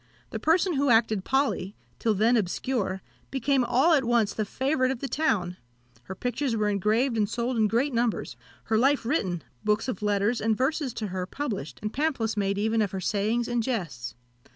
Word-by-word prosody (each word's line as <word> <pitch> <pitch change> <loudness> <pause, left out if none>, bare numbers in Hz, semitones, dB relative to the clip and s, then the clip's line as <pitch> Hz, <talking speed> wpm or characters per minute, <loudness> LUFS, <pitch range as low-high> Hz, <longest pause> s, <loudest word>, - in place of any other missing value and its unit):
The - - -4
person 345 +3 +2
who 280 0 +2
acted 225 -4 +3
Polly, 265 -8 0 0.2
till 220 -2 +1
then 225 +5 +3
obscure, 200 -1 -1 0.3
became 270 0 +1
all 265 +8 +3
at 285 -4 +4
once 235 -4 +2
the 215 - -2
favourite 260 +4 0
of 265 - -2
the 275 - -3
town; 205 - 0 0.5
her 190 - -7
pictures 245 +3 -1
were 210 -1 +1
engraved 220 +5 +1
and 210 -2 +1
sold 240 +2 -2
in 220 -2 +3
great 245 +6 +1
numbers; 235 -1 -1 0.3
her 220 -1 +1
life 270 0 +2
written, 190 - -1 0.2
books 210 +2 +1
of 250 -7 -3
letters 210 +3 +1
and 220 -1 +1
verses 270 +1 0
to 215 -2 -3
her 185 0 -3
published, 195 - -4
and 210 - -3
pamphlets 265 -7 0
made 200 -1 0
even 220 +2 +1
of 205 - +1
her 190 - -2
sayings 215 +5 0
and 240 -1 0
jests. 175 - -3
225 Hz, 190 wpm, -27 LUFS, 205-260 Hz, 0.5 s, at